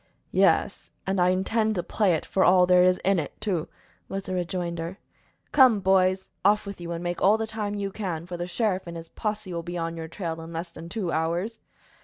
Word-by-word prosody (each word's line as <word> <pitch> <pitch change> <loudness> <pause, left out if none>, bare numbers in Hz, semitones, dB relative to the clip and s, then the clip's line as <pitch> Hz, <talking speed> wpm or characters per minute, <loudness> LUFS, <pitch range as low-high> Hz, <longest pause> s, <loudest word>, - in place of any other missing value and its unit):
"Yes, - - +2 0.2
and 190 0 0
I 180 - +5
intend 215 +4 +1
to 175 - -1
play 195 0 +2
it 155 - -4
for 190 - +1
all 180 0 +6
there 180 0 +5
is 180 0 +4
in 195 -1 +3
it, 150 - -6
too," 180 -6 -1 0.4
was 195 0 -3
the 185 - -5
rejoinder. 175 0 -3 0.5
"Come, 255 -7 +6
boys, 190 0 +2 0.2
off 210 +2 +4
with 200 -3 -7
you, 170 0 -5
and 170 0 -4
make 175 0 -3
all 205 +3 +5
the 220 - -2
time 215 -2 -3
you 200 -1 -3
can, 175 -6 -4
for 180 0 -6
the 175 0 -4
sheriff 190 -1 -1
and 170 0 -6
his 165 0 -9
posse 210 -4 -4
will 170 - -2
be 175 +1 -5
on 165 0 -3
your 165 -1 -6
trail 165 -1 -5
in 165 +1 -9
less 170 +1 -5
than 170 0 -10
two 190 -4 -2
hours." 170 +8 -1
185 Hz, 225 wpm, -26 LUFS, 170-200 Hz, 0.5 s, all